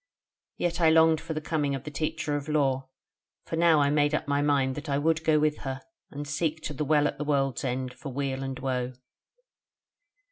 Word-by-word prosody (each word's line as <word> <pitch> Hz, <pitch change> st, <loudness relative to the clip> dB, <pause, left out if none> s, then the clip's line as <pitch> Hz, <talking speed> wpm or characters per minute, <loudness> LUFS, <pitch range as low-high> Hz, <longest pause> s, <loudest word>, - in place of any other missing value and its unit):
Yet 175 Hz, 0 st, -1 dB
I 165 Hz, -, +6 dB
longed 160 Hz, -1 st, +5 dB
for 165 Hz, -1 st, -5 dB
the -, -, -1 dB
coming 150 Hz, -3 st, -1 dB
of 135 Hz, -, -6 dB
the 150 Hz, -, -7 dB
Teacher 155 Hz, 0 st, -2 dB
of 145 Hz, +1 st, -4 dB
Lore; 135 Hz, -3 st, +1 dB, 0.6 s
for -, -, -3 dB
now 165 Hz, -2 st, +5 dB
I 140 Hz, 0 st, +3 dB
made 145 Hz, 0 st, +2 dB
up -, -, -3 dB
my 140 Hz, 0 st, +1 dB
mind 140 Hz, -2 st, +2 dB
that 150 Hz, +3 st, -7 dB
I 140 Hz, -, +1 dB
would 160 Hz, +2 st, +1 dB
go 155 Hz, -1 st, +4 dB
with 150 Hz, 0 st, +1 dB
her, 135 Hz, -1 st, -4 dB, 0.3 s
and 145 Hz, +1 st, -6 dB
seek 155 Hz, +2 st, -1 dB
to 150 Hz, -, -4 dB
the 150 Hz, -, -2 dB
Well 150 Hz, 0 st, +3 dB
at 140 Hz, -, -5 dB
the -, -, -1 dB
World's 135 Hz, -3 st, 0 dB
End 130 Hz, 0 st, -2 dB
for 140 Hz, -, -8 dB
weal 135 Hz, 0 st, -2 dB
and 135 Hz, -1 st, -4 dB
woe. 130 Hz, -1 st, -2 dB
145 Hz, 215 wpm, -27 LUFS, 135-155 Hz, 0.6 s, I